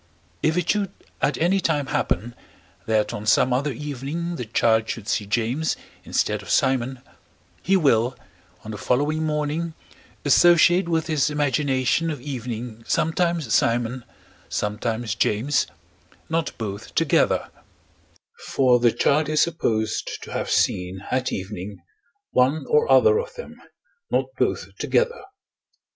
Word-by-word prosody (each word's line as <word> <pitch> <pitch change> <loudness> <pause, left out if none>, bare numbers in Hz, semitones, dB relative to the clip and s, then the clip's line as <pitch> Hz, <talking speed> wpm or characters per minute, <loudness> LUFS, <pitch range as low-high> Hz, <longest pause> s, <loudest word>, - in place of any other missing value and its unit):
If 160 +2 +1
it 175 -2 0
should 200 -2 -1 0.3
at 150 - +1
any 180 +4 +2
time 150 -5 0
happen, 120 -2 -1 0.5
that 110 -1 +1
on 105 +1 -6
some 125 +3 +4
other 140 +4 0
evening 150 +6 -4
the 125 - -5
child 110 0 +2
should 110 -3 -5
see 105 - -1
James 120 +9 0 0.3
instead - - 0
of - - -12
Simon, 130 -1 +1 0.6
he 195 +2 +3
will, 125 -6 +2 0.5
on 110 - -7
the 105 - -7
following 145 +8 +1
morning, 155 +2 -2 0.5
associate 175 +4 +5
with 165 -1 +1
his 155 -3 +1
imagination 145 +1 +1
of 150 - -4
evening 120 -4 -6
sometimes 165 -6 0
Simon, 120 +2 +1 0.5
sometimes 110 +1 -2
James, 120 +4 +1 0.6
not 165 0 -1
both 100 -3 -6
together: - - +2 1.0
for 125 -2 +3
the 120 -1 +4
child 150 +6 +2
is 155 0 +2
supposed 110 -10 -1
to - - -9
have - - -3
seen, 90 +1 0
at 130 0 0
evening, 95 +1 -5 0.5
one 130 +5 +2
or 455 +1 +3
other 450 -1 +6
of 480 +1 -6
them, 480 - -9 0.5
not - - +1
both - - -1
together. 480 0 +1
135 Hz, 130 wpm, -23 LUFS, 115-160 Hz, 1.0 s, other